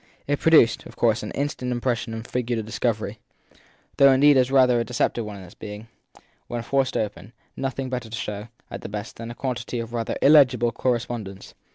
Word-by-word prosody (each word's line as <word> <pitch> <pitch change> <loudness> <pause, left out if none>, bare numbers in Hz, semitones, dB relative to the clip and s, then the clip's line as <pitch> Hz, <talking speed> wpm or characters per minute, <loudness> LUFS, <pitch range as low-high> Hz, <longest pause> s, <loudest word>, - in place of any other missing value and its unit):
It 145 0 0
produced 155 -9 +4
of - - -14
course 115 -1 +2
an 105 - -5
instant 140 -3 -2
impression 120 -1 -1
and 110 0 -6
figured 125 -1 -2
as 110 - -2
a - - -11
discovery; 110 -1 -2 0.8
though 140 0 +7
indeed 145 +2 +6
as 130 -1 +3
rather 130 -3 +4
a - - +1
deceptive 120 0 -1
one 105 -1 -7
on 95 - -10
its 90 +2 -14
having, 105 +2 -8 0.6
when 120 -1 -4
forced 135 +1 0
open, 105 0 -4 0.2
nothing 135 0 -3
better 125 -3 -4
to 110 - -5
show, 105 0 -5 0.2
at - - -6
the - - -7
best, 105 +1 -6
than 115 0 -7
a 120 - -7
quantity 125 -2 -4
of 115 0 -6
rather 115 -1 -2
illegible 130 -5 +6
correspondence. 115 -6 -3
120 Hz, 200 wpm, -24 LUFS, 110-130 Hz, 0.8 s, though